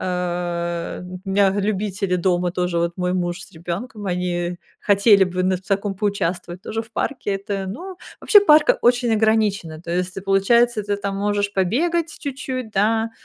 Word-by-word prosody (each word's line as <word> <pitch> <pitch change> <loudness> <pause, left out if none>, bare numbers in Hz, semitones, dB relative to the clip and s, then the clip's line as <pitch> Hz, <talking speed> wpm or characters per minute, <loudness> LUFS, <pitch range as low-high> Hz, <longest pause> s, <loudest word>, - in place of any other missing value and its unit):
Э, 175 -1 -3
у 180 0 -8
меня 195 0 +3
любители 195 -1 -1
дома 180 0 +1
тоже, 180 -2 -1
вот 170 +1 -1
мой 180 0 -1
муж 175 0 -2
с - - -12
ребенком, 195 +6 -6
они 175 -1 -2 0.2
хотели 200 -1 +5
бы 185 0 -2
на 185 0 +2
в - - -10
таком 195 +1 -1
поучаствовать, 185 -3 -2
тоже 225 +1 -3
в 225 +1 -18
парке, 245 -2 -2
это, 195 -1 -4
ну. 355 - -7 0.2
Вообще, 415 - +7
парк 305 -6 +6
очень 240 -1 +3
ограничено, 210 -7 +1
то 170 - -8
есть 180 +1 -1
ты, 195 - -5
получается, 210 +4 +3
ты 205 0 -1
там 200 -1 -4
можешь 205 0 0
побегать 320 - 0
чуть-чуть, 260 -4 -5
да, 220 +3 +1
195 Hz, 170 wpm, -21 LUFS, 180-220 Hz, 0.2 s, Вообще